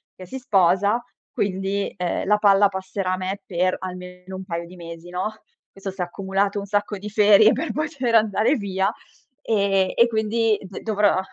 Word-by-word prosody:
che 185 - -10
si 265 +8 -7
sposa, 200 0 +2 0.3
quindi, 195 +1 -2
ehm, 180 -2 -2
la 210 +1 +4
palla 200 -1 +5
passerà 190 0 -3
a 185 - -1
me 190 +2 -4
per 185 0 0
almeno 180 0 -8
un 190 - -6
paio 170 -2 -4
di 180 - -13
mesi, 170 0 -10
no. 185 +4 -3 0.4
Questo 195 0 -7
s'è 185 -1 -3
accumulato 195 +3 -1
un 200 - -6
sacco 205 +1 -1
di 210 +2 -6
ferie 210 0 +6
per 325 - -2
poter 285 -6 -2
andare 215 +3 +3
via 195 -2 -1 0.5
e 200 -5 +1
e 235 - +6
quindi 220 0 +1
d 190 -1 -9
dovrò 210 -3 +2
195 Hz, 175 wpm, -23 LUFS, 185-210 Hz, 0.5 s, ferie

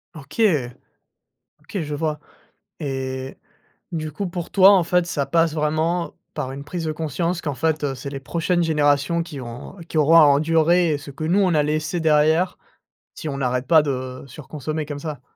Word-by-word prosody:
OK! 150 +8 -6 1.2
OK, 195 - -5
je 150 -1 -4
vois 155 0 -2 0.6
et 130 -2 -4 0.5
du 155 -2 -3
coup 195 +5 -3
pour 175 -1 -5
toi 195 0 +7
en 190 -4 +5
fait 180 0 +2
ça 145 -5 -1
passe 165 0 +2
vraiment 160 +3 0 0.2
par 135 -4 -4
une 140 +1 -7
prise 165 +3 -5
de 155 - -1
conscience 165 +3 -2
qu'en 145 - -2
fait, 155 +1 0
heu, 135 -2 -1
c'est 140 +2 -6
les 135 - -5
prochaines 175 +3 0
générations 150 +1 +2
qui 155 -4 -8
vont 120 +6 -8
qui 160 - -3
auront 155 +2 +6
à 165 - +9
endurer 160 +2 +3
ce 145 0 -10
que 145 +4 -7
nous 175 +5 +2
on 185 -3 +3
a 150 -2 +3
laissé 155 +3 -1
derrière, 160 +3 +3 0.6
si 155 - -5
on 140 - -4
n'arrête 125 -1 -1
pas 160 -2 +6
de 130 -2 -4
surconsommer 150 +3 -5
comme 145 -1 -6
ça? 150 -4 -6
155 Hz, 185 wpm, -22 LUFS, 140-165 Hz, 1.2 s, à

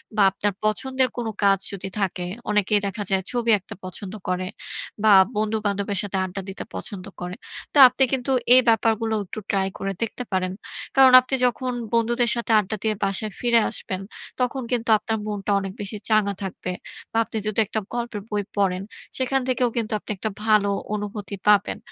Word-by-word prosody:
বা 215 - +3
আপনার 205 +1 -1
পছন্দের 260 +4 +1
কোন 235 - -2 0.2
কাজ 195 -1 +5
যদি 195 -1 -5
থাকে, 185 -2 -1 0.3
অনেকেই 210 0 +2
দেখা 205 +2 -4
যায়, 190 -1 +1
ছবি 240 -2 -1
আঁকতে 195 - -11
পছন্দ 185 +2 -6 0.2
করে। 185 0 -1 0.6
বা 220 - +5 0.3
বন্ধুবান্ধবের 210 -2 -1
সাথে 200 -1 -3
আড্ডা 190 +1 -5
দিতে 190 - -6
পছন্দ 195 -4 -6 0.2
করে। 180 +1 -4 0.4
তো - - 0
আপনি 255 +2 +1
কিন্তু 265 0 0 0.2
এই 255 - +8
ব্যাপারগুলো, 225 0 +2
একটু 190 +4 -7
ট্রাই 195 -1 +1
করে 195 0 -2
দেখতে 230 +2 -3
পারেন। 185 -1 0 0.4
কারণ, 265 -1 +8
আপনি 255 +1 -2
যখন 250 +1 0 0.2
বন্ধুদের 235 +1 +2
সাথে 235 -1 -2
আড্ডা 210 +1 -2
দিয়ে 215 -1 +1
বাসায় 195 +2 -1
ফিরে 235 -1 +4
আসবেন, 185 0 -5 0.4
তখন 255 +1 0
কিন্তু 235 -2 0
আপনার 220 +1 -2
মনটা 205 -1 -3
অনেক 195 -1 -5
বেশি 205 +1 -5
চাঙ্গা 215 -2 +3
থাকবে। 185 -1 -4 0.4
বা 225 - -2
আপনি 220 - -6
যেহেতু 215 0 -1
একটা 220 - -2
গল্পের 235 -3 -3
বই 205 -1 -1
পড়েন, 190 -2 +1 0.4
সেখান 265 +1 +1
থেকেও 250 -1 +2
কিন্তু, 225 -1 -1
আপনি - - -7
একটা 220 - -2 0.2
ভালো 210 -2 +4 0.2
অনুভূতি 205 -1 -4
পাবেন। 210 +1 +4
210 Hz, 175 wpm, -24 LUFS, 195-235 Hz, 0.6 s, এই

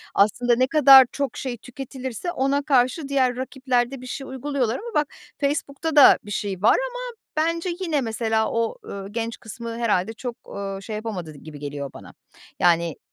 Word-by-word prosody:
aslında 235 +4 +3
ne 255 +2 +2
kadar 275 -3 +8
çok 280 -1 -3
şey 255 -3 -4
tüketilirse 260 - -6
ona 275 -1 +1
karşı 275 +1 +2
diğer 260 -3 +2
rakipler 255 -1 -1
de 270 -2 -7
bir 255 - -9
şey 270 +2 -6
uyguluyorlar 265 -3 -1
ama 465 +1 -8
bak 300 -1 +2 0.3
Facebook'ta 290 +2 -2
da 290 - +9
bir 205 - -10
şey 195 -3 -3
var 215 - +5
ama - - -6 0.4
bence 335 +3 0
yine, 325 -6 0
mesela, 220 -1 0
o, 230 - -1
ııı, 195 0 -7
genç 230 +1 -3
kısmı 230 +1 -7
herhâlde 220 -3 +1
çok, 240 +1 -6 0.2
eee, 195 -1 -4
şey 215 +2 -6
yapamadı 205 -8 -5
gibi 150 0 -11
geliyor 140 -1 -5
bana. - - -12 0.5
Yani 170 -2 +2
245 Hz, 175 wpm, -23 LUFS, 215-275 Hz, 0.5 s, da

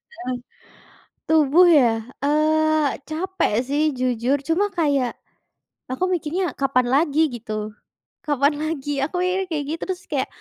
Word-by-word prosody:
Heeh. 250 +1 -4 1.0
Tubuh 320 +3 +5
ya? 255 - +5 0.4
Eee, 310 0 +2
capek 365 - -1 0.2
sih 290 +2 +1 0.2
jujur, 250 +1 +1
cuma 335 +5 +2
kayak 280 -6 +2 0.8
aku 260 +7 -2
mikirnya 345 +2 -1 0.2
kapan 265 -2 +2
lagi 295 +1 +2 0.2
gitu, 235 -1 -8 0.7
kapan 290 -1 +2
lagi. 310 -3 -3 0.2
Aku 320 - -8
mikirnya 370 +1 0
kayak 295 -3 -2
gitu 325 - -4
terus 375 -1 -4
kayak, 270 -3 0
300 Hz, 125 wpm, -22 LUFS, 270-325 Hz, 1.0 s, Tubuh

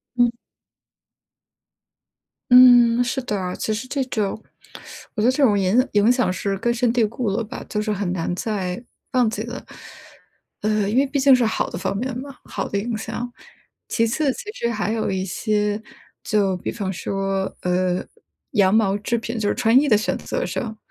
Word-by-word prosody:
嗯。 240 -1 +4 2.2
嗯， 245 -1 +8
是 255 +2 -1
的， 195 -7 -3
其 215 - -2
实 225 +4 -4
这 275 0 -1
种 220 -4 -3 0.7
我 215 - -1
觉 - - +2
得 250 - +5
这 275 - -1
种 220 -7 +4
影 200 +7 +3
影 210 +3 +5
响 250 -7 +1
是 195 +2 -2
根 235 +4 0
深 240 0 +1
蒂 240 0 +1
固 230 +1 -2
了 200 +4 -1
吧， 250 +4 -8
就 210 - -1
是 215 0 -1
很 195 -3 -2
难 175 -1 -2
再 190 0 -3 0.3
忘 250 -3 +3
记 215 - -4
了。 240 +2 -7 1.0
呃， 210 -1 +1
因 225 - 0
为 275 - +5
毕 280 - -2
竟 275 0 +6
是 250 -2 +4
好 220 - -1
的 - - -6
方 190 +2 -2
面 255 +3 -3
嘛， 275 +1 -8
好 - - -4
的 200 - -2
影 225 +3 -2
响。 235 +3 -5 0.6
其 230 - +1
次， 275 +4 +1
其 415 - -7
实 235 - -2
还 215 -2 -1
有 225 -1 -1
一 190 -1 -1
些 210 +2 -1 0.4
就 200 -3 +1
比 - - -4
方 200 -4 -3
说， 195 +1 -2
呃， 180 0 0 0.5
羊 200 -5 +3
毛 205 -3 +3
制 220 +3 -1
品 230 0 -4
就 210 - 0
是 - - +1
穿 245 0 +4
衣 290 - +1
的 215 - +5
选 215 - -1
择 - - -3
上， 220 -2 -4
220 Hz, 205 characters per minute, -22 LUFS, 200-245 Hz, 2.2 s, 嗯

